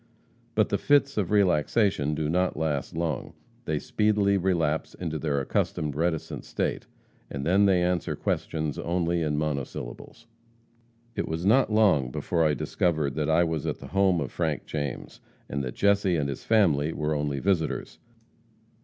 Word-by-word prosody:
But 110 -2 +3
the 100 - 0
fits 140 -1 +3
of 100 -5 0
relaxation 95 -4 +2
do 75 0 -1
not 90 +2 0
last 75 -2 -2
long. 80 -5 -2 0.3
They - - 0
speedily 105 -2 +1
relapse 85 -5 0
into 80 -3 -4
their 75 -3 0
accustomed 70 +1 -1
reticent 80 0 -2
state, - - -3 0.4
and 70 0 -5
then 95 +4 +4
they 90 -2 +3
answer 90 -1 0
questions 75 -3 -2
only 85 0 0
in 75 -2 0
monosyllables. 75 - -5 0.9
"It - - -2
was 80 +2 -3
not 115 +3 +4
long 95 - +3
before 85 +6 -1
I 75 -2 +2
discovered 75 -1 0
that 75 +1 -1
I 80 +2 +4
was 80 -3 -2
at - - -2
the - - -11
home 95 -3 +3
of 70 - -3
Frank 80 -4 -2
James, 75 -3 -5 0.3
and 70 0 -3
that 65 - -5
Jesse 100 -2 +3
and 70 -3 0
his 70 - -5
family 80 -9 +3
were 75 0 -1
only 75 -1 -1
visitors. 90 -4 -1
80 Hz, 160 wpm, -27 LUFS, 75-95 Hz, 0.9 s, then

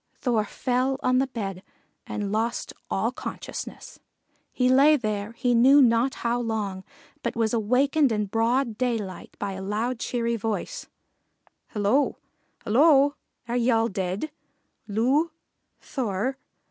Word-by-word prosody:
Thor 230 -5 +1
fell 255 +4 -1
on 255 0 +3
the 270 - +1
bed 195 -7 -5 0.5
and 205 -2 -3
lost 225 +3 -1 0.2
all - - 0
consciousness. - - -7 0.5
He 250 - +1
lay 275 +4 +6
there 215 -4 -3
he 245 +1 +1
knew 260 +5 +6
not 240 0 +4
how 235 +1 +1
long, 210 -5 -3 0.4
but 235 - -3
was 225 -1 +1
awakened 255 +5 +2
in 210 -1 0
broad 230 +2 0
daylight 225 -7 -3
by 200 -1 -3
a 190 0 -6
loud, 220 +5 -2
cheery 235 -1 -1
voice: 220 0 -3 0.8
"Hello! 215 +7 +1 0.5
Hello! 280 +4 +5 0.3
are 240 - -2
ye 245 0 +2
all 225 -1 +3
dead? 190 +9 -3 0.6
Loo! 255 +10 +2 0.5
Thor! 255 +1 -2
235 Hz, 130 wpm, -25 LUFS, 210-260 Hz, 0.8 s, lay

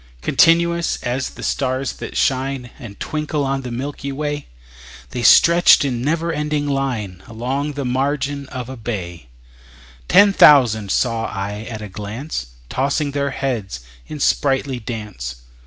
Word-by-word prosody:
Continuous 170 0 +3
as 125 +2 -2
the - - -11
stars 130 0 -1
that - - -7
shine 130 -1 0
And 105 -5 -10
twinkle 150 -1 -2
on 135 0 -1
the 125 - -6
milky 140 +3 -5
way, 145 +1 -3 0.6
The 125 - -3
stretched 170 +3 +6
in 125 -4 -2
never 165 +4 0
ending 150 -1 -1
line 120 -10 -2
Along 130 +6 -3
the 140 -1 -4
margin 140 +2 -1
of 125 -3 -6
a 130 - -7
bay: 90 - -6 0.8
Ten 200 -1 +6
thousand 120 - +6
saw 115 +2 0
I 105 +3 -5
at 110 -2 -6
a - - -6
glance, 105 - -5 0.2
Tossing 140 - -1
their 140 0 -1
heads 120 - -3 0.3
in 150 - -7
sprightly 135 -2 +1
dance. 105 - -6
135 Hz, 140 wpm, -20 LUFS, 115-145 Hz, 0.8 s, stretched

